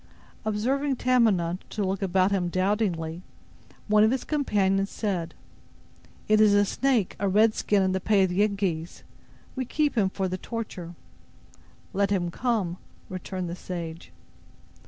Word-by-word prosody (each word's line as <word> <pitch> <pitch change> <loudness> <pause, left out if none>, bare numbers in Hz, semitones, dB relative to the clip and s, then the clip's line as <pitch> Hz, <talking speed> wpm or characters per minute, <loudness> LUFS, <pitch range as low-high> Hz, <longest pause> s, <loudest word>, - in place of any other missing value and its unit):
Observing 265 +7 0
Tamenund 215 -9 +2
to 210 - -2
look 195 +1 -1
about 190 0 +2
him 180 -3 0
doubtingly, 185 -3 -1 0.7
one 210 0 +5
of 220 - +5
his 260 +1 -1
companions 200 -9 +1
said: 180 -6 -3 0.9
"It 215 0 +4
is 210 -1 +6
a 205 0 +4
snake—a 215 -5 0
red 215 +3 +4
skin 205 -2 +1
in 190 - +1
the 190 - 0
pay 195 +1 +3
of 190 - +2
the 180 - -3
Yengeese. 195 -6 -1 0.5
We 260 - -1
keep 290 +3 0
him 200 -5 +2
for 190 0 -2
the 185 0 -4
torture." 185 -7 -6 1.0
"Let 200 0 +1
him 180 -4 0
come," 210 -6 -1 0.3
returned 185 0 -5
the 170 - -4
sage. 170 -3 -7
195 Hz, 145 wpm, -26 LUFS, 180-215 Hz, 1.0 s, is